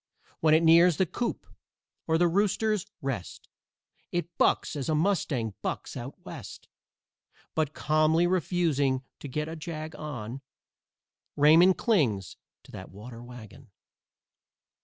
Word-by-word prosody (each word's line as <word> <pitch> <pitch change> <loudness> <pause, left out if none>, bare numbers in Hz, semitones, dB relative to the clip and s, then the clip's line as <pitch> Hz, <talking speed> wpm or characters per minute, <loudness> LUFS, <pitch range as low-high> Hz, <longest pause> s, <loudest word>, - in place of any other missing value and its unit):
When 155 -1 +4
it 160 - +3
nears 170 +1 +6
The 190 - +3
Coop 235 +8 -3 0.6
or 160 0 +3
The 175 +1 +4
Rooters' 205 +2 +1 0.2
Rest 125 -9 -5 0.6
It 175 -1 -3
bucks - - +2
as 140 +1 -3
a 155 - +2
mustang 150 - 0
bucks - - -4
out - - -6
West. - - -9 0.9
But, 155 -2 -1
calmly 155 +2 +2
refusing 160 -7 +1 0.2
to - - -7
get 150 +3 -3
a 160 - -6
jag 155 -1 -6
on, 135 -4 -6 0.9
Raymond 165 +6 +6
clings 120 - +1 0.3
to - - -16
that 95 - -9
water 115 +4 -10
wagon. 120 0 -12
155 Hz, 125 wpm, -28 LUFS, 130-175 Hz, 0.9 s, nears